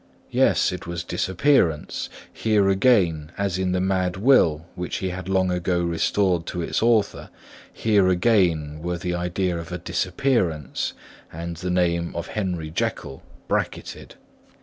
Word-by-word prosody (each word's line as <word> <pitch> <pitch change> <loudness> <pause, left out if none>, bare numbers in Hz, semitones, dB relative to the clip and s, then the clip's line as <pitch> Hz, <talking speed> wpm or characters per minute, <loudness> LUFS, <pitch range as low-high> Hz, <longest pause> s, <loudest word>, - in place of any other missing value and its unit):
Yes, - - +3
it - - -7
was 85 -1 -4
disappearance; 90 - +1 0.2
here 105 -3 +2
again, 95 -7 +2
as 100 -2 -1
in 95 -1 0
the 90 - +1
mad 90 -1 0
will 90 - +4
which 90 0 -4
he 95 - -2
had 95 +1 -6
long 95 -1 +2
ago 90 0 0
restored 85 +1 +1
to 90 - -3
its - - -1
author, 115 -2 +1 0.4
here 105 -4 +2
again 90 -6 +2
were 90 +1 -2
the 90 0 -3
idea 90 0 -1
of 85 0 -8
a 90 - -3
disappearance 90 - -1 0.4
and 85 +1 -6
the 90 +2 -4
name 85 -1 0
of 85 0 -4
Henry 90 -7 -3
Jekyll 70 -3 -3 0.3
bracketted. - - -3
90 Hz, 145 wpm, -23 LUFS, 85-95 Hz, 0.4 s, will